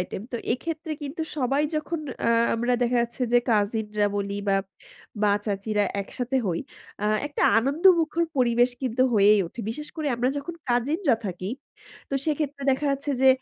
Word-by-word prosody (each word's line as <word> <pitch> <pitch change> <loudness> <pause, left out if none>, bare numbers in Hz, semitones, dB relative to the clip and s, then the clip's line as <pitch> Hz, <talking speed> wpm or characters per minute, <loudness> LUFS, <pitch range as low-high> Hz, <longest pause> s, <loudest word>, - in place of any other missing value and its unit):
Item. 180 +2 -4
তো - - -1 0.2
এক্ষেত্রে 315 +4 -4
কিন্তু 290 +3 -4
সবাই 275 +2 +1
যখন 305 +2 -3 0.3
আ - - +4 0.3
আমরা 240 +2 0
দেখা 245 +1 +2
যাচ্ছে 240 +2 -4
যে 245 - +7
কাজিনরা 210 -1 +1
বলি 200 0 -2
বা 195 - +4 0.7
মা-চাচীরা 205 0 +1 0.2
একসাথে 250 +5 -3
হই 170 -2 0 0.4
আ - - 0 0.2
একটা 290 - -3 0.2
আনন্দমুখর 330 +5 +3
পরিবেশ 245 -1 +3
কিন্তু 255 0 +1
হয়েই 205 0 +6
ওঠে। 230 - -8
বিশেষ 300 +6 -6
করে 310 -2 -1
আমরা 245 +2 +1
যখন 290 +5 -6 0.2
কাজিনরা 270 - +2
থাকি, 185 0 -4 0.6
তো - - -1
সেক্ষেত্রে 295 -2 -1
দেখা 270 +2 0
যাচ্ছে 280 +1 -2
যে 265 - +7
250 Hz, 155 wpm, -25 LUFS, 210-295 Hz, 0.7 s, যে